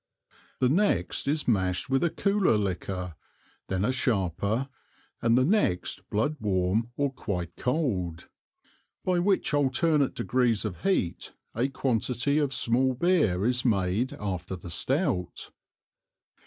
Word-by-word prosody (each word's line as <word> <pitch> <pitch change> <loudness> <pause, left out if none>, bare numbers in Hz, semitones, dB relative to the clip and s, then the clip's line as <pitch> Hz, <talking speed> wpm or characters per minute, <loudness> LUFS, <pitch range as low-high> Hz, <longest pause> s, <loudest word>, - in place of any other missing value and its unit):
The 130 - +2
next 145 - +1
is 150 +1 0
Mash'd 95 -6 +1
with 135 +2 +1
a 170 - +3
cooler 200 - +2
Liquor, 90 -2 -3 0.5
then 95 +1 -1
a 125 - +2
sharper, 110 0 0 0.5
and 115 +1 +3
the 130 - +4
next 175 - 0
Blood 130 +9 0
warm 100 +2 0
or 140 -1 0
quite 90 -9 -4
Cold; 100 - -2 0.8
by 180 -1 +2
which 190 -3 +1
alternate 145 +1 +2
degrees 120 -4 +1
of 95 -5 -5
Heat, 190 - -1 0.2
a 120 +4 +1
Quantity 130 +1 0
of 145 -3 0
small 130 +1 +1
Beer 125 - +2
is 125 +1 +2
made 110 +4 +1
after 95 -7 -4
the 90 -1 -9
Stout. 125 - -1
120 Hz, 130 wpm, -27 LUFS, 95-140 Hz, 0.8 s, the